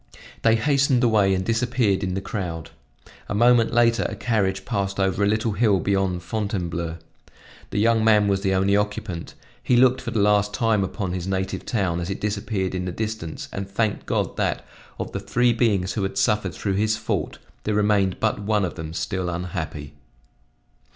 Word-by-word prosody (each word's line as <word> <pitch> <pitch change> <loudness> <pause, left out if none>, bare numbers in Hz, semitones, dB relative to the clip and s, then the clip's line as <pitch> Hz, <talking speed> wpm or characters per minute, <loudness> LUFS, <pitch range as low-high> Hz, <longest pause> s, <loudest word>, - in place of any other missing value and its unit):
They 115 0 +4
hastened 135 +1 +2
away 105 -5 +4
and 95 0 -2
disappeared 115 -3 +1
in 95 -1 -2
the 95 - -2
crowd. 90 -6 -5 0.6
A - - -1
moment 120 +1 +4
later 120 -1 +3
a - - -5
carriage 100 -5 0
passed 100 -3 -2
over 95 0 +1
a - - +3
little 110 +2 +1
hill 105 -1 +2
beyond 95 -3 0
Fontainebleau. 85 -4 -3 0.7
The - - -4
young 115 +1 +3
man 105 -2 +5
was 100 -1 +1
the 95 -1 +1
only 95 +1 +3
occupant; 105 -4 -3 0.3
he 125 - +2
looked 130 +1 +4
for 125 - -5
the 115 - -3
last 105 0 +3
time 115 -4 +2
upon 95 -1 -3
his 90 0 -4
native 95 0 -3
town 95 -7 0
as 85 +1 -4
it 100 - -3
disappeared 100 -2 -2
in 90 -1 -2
the 90 - -3
distance 110 -5 -5
and 100 0 -4
thanked 105 +1 -1
God - - -1
that, - - -1 0.3
of - - -5
the 100 - -3
three 120 +5 +2
beings 105 -6 +1
who 105 - -2
had 95 0 -3
suffered 100 -6 +1
through 100 - -2
his 110 +2 +1
fault, 110 - -3 0.3
there 105 - -1
remained 100 -3 +2
but 110 -2 0
one 105 -1 +1
of 90 - -4
them 80 -1 -7
still 90 0 -2
unhappy. 85 -4 -5
100 Hz, 185 wpm, -23 LUFS, 95-110 Hz, 0.7 s, man